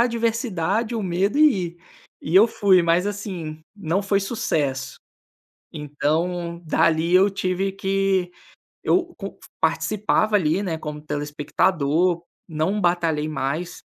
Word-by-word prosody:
adversidade, 230 Hz, -3 st, -1 dB
o 225 Hz, -, -2 dB
medo 190 Hz, +7 st, 0 dB
e 270 Hz, -, +4 dB
ir. 170 Hz, -, -15 dB, 0.4 s
E 160 Hz, -, -4 dB
eu 200 Hz, +4 st, +8 dB
fui, 195 Hz, -5 st, +3 dB
mas, 170 Hz, +3 st, +2 dB
assim, 180 Hz, -7 st, -5 dB
não 195 Hz, -1 st, -1 dB
foi 200 Hz, 0 st, +1 dB
sucesso, 145 Hz, -, -2 dB, 0.8 s
então 165 Hz, +4 st, -2 dB
dali 160 Hz, +1 st, +2 dB
eu 190 Hz, +2 st, +6 dB
tive 190 Hz, 0 st, -1 dB
que 195 Hz, -1 st, 0 dB, 0.5 s
eu 350 Hz, -2 st, +1 dB
com 195 Hz, -2 st, -7 dB, 0.2 s
participava 210 Hz, +5 st, +1 dB
ali, 175 Hz, -1 st, +2 dB
né, 170 Hz, -5 st, -2 dB
como 150 Hz, -1 st, -6 dB
telespectador, 150 Hz, +3 st, 0 dB, 0.3 s
não 165 Hz, +6 st, -1 dB
batalhei 165 Hz, -4 st, +1 dB
mais, 155 Hz, +4 st, -3 dB
180 Hz, 120 wpm, -23 LUFS, 160-200 Hz, 0.8 s, eu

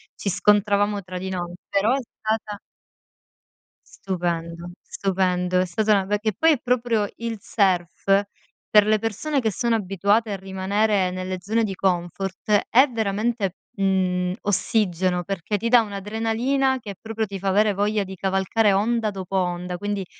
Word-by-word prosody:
ci 200 Hz, -, -3 dB
scontravamo 205 Hz, +1 st, +2 dB
tra 185 Hz, 0 st, -7 dB
di 190 Hz, -, -5 dB
noi, 175 Hz, -2 st, -4 dB, 0.2 s
però 200 Hz, +4 st, +2 dB
è 275 Hz, -, +1 dB
stata 215 Hz, -2 st, -4 dB, 1.3 s
Stupendo, 170 Hz, -2 st, -4 dB
stupendo. 180 Hz, -2 st, 0 dB
È 185 Hz, -, +2 dB
stata 210 Hz, +5 st, +1 dB
una 195 Hz, -2 st, +2 dB
be 205 Hz, +1 st, 0 dB
che 215 Hz, -1 st, -1 dB
poi 325 Hz, 0 st, +5 dB
è 265 Hz, -, -2 dB
proprio 240 Hz, -4 st, +1 dB
il 230 Hz, -2 st, -4 dB
surf, 180 Hz, -5 st, 0 dB, 0.7 s
per 210 Hz, -1 st, +6 dB
le 215 Hz, 0 st, +3 dB
persone 260 Hz, +7 st, -1 dB
che 220 Hz, -2 st, 0 dB
sono 235 Hz, +4 st, 0 dB
abituate 205 Hz, +2 st, +1 dB
a -, -, -1 dB
rimanere 190 Hz, +1 st, 0 dB
nelle 185 Hz, 0 st, -4 dB
zone 220 Hz, +4 st, 0 dB
di 200 Hz, -3 st, -2 dB
comfort, 190 Hz, +3 st, -1 dB
è 260 Hz, +5 st, +6 dB
veramente, 215 Hz, -3 st, -1 dB, 0.2 s
mhmm, 185 Hz, -2 st, +1 dB
ossigeno, 185 Hz, -3 st, 0 dB
perché 195 Hz, +1 st, -2 dB
ti 230 Hz, -, -2 dB
dà 240 Hz, 0 st, +6 dB
un'adrenalina 225 Hz, +6 st, -1 dB
che 205 Hz, -4 st, -8 dB
proprio 225 Hz, 0 st, -3 dB
ti 200 Hz, -1 st, -6 dB
fa 195 Hz, +1 st, -2 dB
avere 205 Hz, +1 st, +3 dB
voglia 205 Hz, +1 st, 0 dB
di 190 Hz, 0 st, -8 dB
cavalcare 195 Hz, +3 st, +1 dB
onda 220 Hz, +2 st, +1 dB
dopo 190 Hz, -1 st, -6 dB
onda, 180 Hz, -1 st, -1 dB
quindi 205 Hz, -1 st, -3 dB
200 Hz, 155 wpm, -23 LUFS, 185-220 Hz, 1.3 s, per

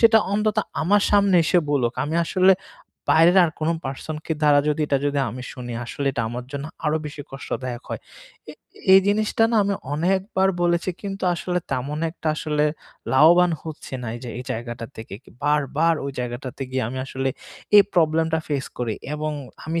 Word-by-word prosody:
সেটা 225 Hz, -1 st, +7 dB
অন্তত 215 Hz, +1 st, +1 dB, 0.3 s
আমার 200 Hz, +4 st, +3 dB
সামনে 200 Hz, -3 st, +4 dB
এসে 175 Hz, -, +3 dB
বলুক।" 125 Hz, -5 st, +1 dB
আমি 150 Hz, +2 st, -3 dB
আসলে 185 Hz, +2 st, +5 dB, 0.6 s
বাইরের 170 Hz, +4 st, +6 dB
আর 165 Hz, -, 0 dB
কোনো 160 Hz, +2 st, +1 dB
person 135 Hz, +3 st, -5 dB
কে 160 Hz, -, 0 dB
দ্বারা 145 Hz, -1 st, +6 dB
যদি 150 Hz, +1 st, 0 dB
এটা 140 Hz, -2 st, +2 dB
যদি 145 Hz, 0 st, 0 dB
আমি 125 Hz, +3 st, -7 dB
শুনি, 120 Hz, -1 st, -7 dB
আসলে 140 Hz, +4 st, -4 dB
এটা 115 Hz, -, -1 dB
আমার 120 Hz, +2 st, -5 dB
জন্য 140 Hz, 0 st, -4 dB, 0.2 s
আরও 150 Hz, +1 st, +2 dB
বেশি 145 Hz, 0 st, -7 dB
কষ্টদায়ক 130 Hz, -2 st, -5 dB
হয়। -, -, -4 dB, 0.5 s
এ -, -, -9 dB, 0.4 s
এই 190 Hz, -, +9 dB
জিনিসটা 215 Hz, +2 st, +1 dB
না 230 Hz, -, +2 dB
আমি 200 Hz, 0 st, 0 dB, 0.2 s
অনেকবার 190 Hz, +4 st, +1 dB
বলেছি, 175 Hz, +1 st, +1 dB
কিন্তু 195 Hz, -1 st, -4 dB
আসলে 180 Hz, +1 st, -2 dB
তেমন 135 Hz, +3 st, -2 dB
একটা 165 Hz, -1 st, -4 dB
আসলে 150 Hz, -1 st, 0 dB, 0.5 s
লাভবান 170 Hz, +6 st, +6 dB
হচ্ছি 155 Hz, -4 st, -8 dB
না, -, -, -5 dB
এই 120 Hz, -, -7 dB
যে 120 Hz, -, -5 dB
এই -, -, -5 dB
জায়গাটা 115 Hz, 0 st, -5 dB
থেকে। 110 Hz, -3 st, -8 dB
কি -, -, -18 dB
বারবার 150 Hz, +3 st, +2 dB
ওই 140 Hz, -, -2 dB
জায়গাটাতে 125 Hz, +2 st, -5 dB
গিয়ে 130 Hz, 0 st, -1 dB
আমি 130 Hz, +2 st, -5 dB
আসলে 135 Hz, 0 st, -2 dB, 0.5 s
এই 205 Hz, -, +10 dB
problem-টা 160 Hz, -1 st, +2 dB
ফেস 140 Hz, -3 st, -1 dB
করি। 115 Hz, -3 st, -1 dB, 0.2 s
এবং 155 Hz, 0 st, -2 dB, 0.3 s
আমি 165 Hz, +1 st, -1 dB
150 Hz, 180 wpm, -23 LUFS, 130-180 Hz, 0.6 s, এই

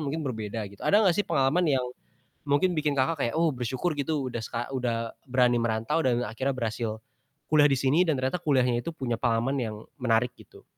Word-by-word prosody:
mungkin 150 Hz, +2 st, -3 dB
berbeda 110 Hz, -3 st, -4 dB
gitu. 100 Hz, -, -17 dB
Ada 210 Hz, +1 st, +4 dB
gak 175 Hz, -, +4 dB
sih 205 Hz, -, +1 dB
pengalaman 155 Hz, -1 st, +2 dB, 0.2 s
yang 125 Hz, -, -2 dB, 0.6 s
mungkin 145 Hz, +6 st, +3 dB
bikin 150 Hz, -3 st, 0 dB
Kakak, 145 Hz, +3 st, +1 dB
kayak, 120 Hz, -, 0 dB
"Oh 165 Hz, -2 st, +3 dB
bersyukur, 130 Hz, +7 st, -2 dB
gitu, 145 Hz, -1 st, -2 dB
udah 120 Hz, -, -3 dB
seka 115 Hz, +1 st, -4 dB
udah 115 Hz, -3 st, -2 dB, 0.2 s
berani 125 Hz, -2 st, +3 dB
merantau, 115 Hz, +6 st, 0 dB
dan 125 Hz, -4 st, +1 dB
akhirnya 130 Hz, +5 st, -2 dB
berhasil 115 Hz, -2 st, -2 dB, 0.6 s
kuliah 150 Hz, -1 st, +6 dB
di 135 Hz, -, +2 dB
sini," 135 Hz, +5 st, +2 dB
dan 155 Hz, -, +2 dB
ternyata 130 Hz, +7 st, -1 dB
kuliahnya 125 Hz, -6 st, +2 dB
itu 170 Hz, -, -7 dB
punya 120 Hz, -7 st, -3 dB
pengalaman 120 Hz, +3 st, +1 dB
yang 110 Hz, -3 st, -3 dB, 0.2 s
menarik 125 Hz, 0 st, +2 dB
gitu? -, -, -18 dB
130 Hz, 195 wpm, -27 LUFS, 115-150 Hz, 0.6 s, kuliah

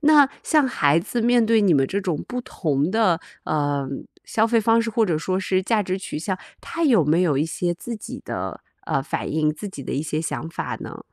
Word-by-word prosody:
那 295 Hz, -2 st, +6 dB
像 305 Hz, -4 st, +3 dB
孩 150 Hz, -, +3 dB
子 225 Hz, +7 st, -2 dB
面 240 Hz, 0 st, +4 dB
对 225 Hz, 0 st, +4 dB
你 185 Hz, -6 st, +4 dB
们 135 Hz, -1 st, +3 dB
这 200 Hz, +6 st, -1 dB
种 175 Hz, -6 st, -2 dB
不 250 Hz, 0 st, -3 dB
同 155 Hz, -, -1 dB
的， 190 Hz, -6 st, +2 dB, 0.2 s
呃， 145 Hz, -2 st, 0 dB, 0.4 s
消 220 Hz, 0 st, +2 dB
费 230 Hz, 0 st, +3 dB
方 225 Hz, +1 st, +4 dB
式， 230 Hz, -, -2 dB
或 225 Hz, 0 st, +2 dB
者 170 Hz, -6 st, 0 dB
说 185 Hz, +3 st, -1 dB
是 185 Hz, 0 st, 0 dB
价 215 Hz, +1 st, +2 dB
值 185 Hz, 0 st, -2 dB
取 185 Hz, -, -5 dB
向， 185 Hz, +3 st, -2 dB, 0.2 s
他 335 Hz, -, -4 dB
有 240 Hz, -, +5 dB
没 155 Hz, +4 st, +3 dB
有 155 Hz, -6 st, +2 dB
一 145 Hz, -, +2 dB
些 175 Hz, +2 st, -1 dB
自 235 Hz, +7 st, -6 dB
己 210 Hz, -, -8 dB
的， -, -, -4 dB, 0.3 s
呃， 135 Hz, -4 st, 0 dB
反 -, -, -3 dB
应， 155 Hz, 0 st, +1 dB
自 200 Hz, +7 st, -7 dB
己 165 Hz, -7 st, -8 dB
的 -, -, -5 dB
一 140 Hz, -, 0 dB
些 155 Hz, 0 st, -2 dB
想 160 Hz, 0 st, -3 dB
法 -, -, -4 dB
呢？ -, -, -7 dB
185 Hz, 250 characters per minute, -23 LUFS, 155-230 Hz, 0.4 s, 那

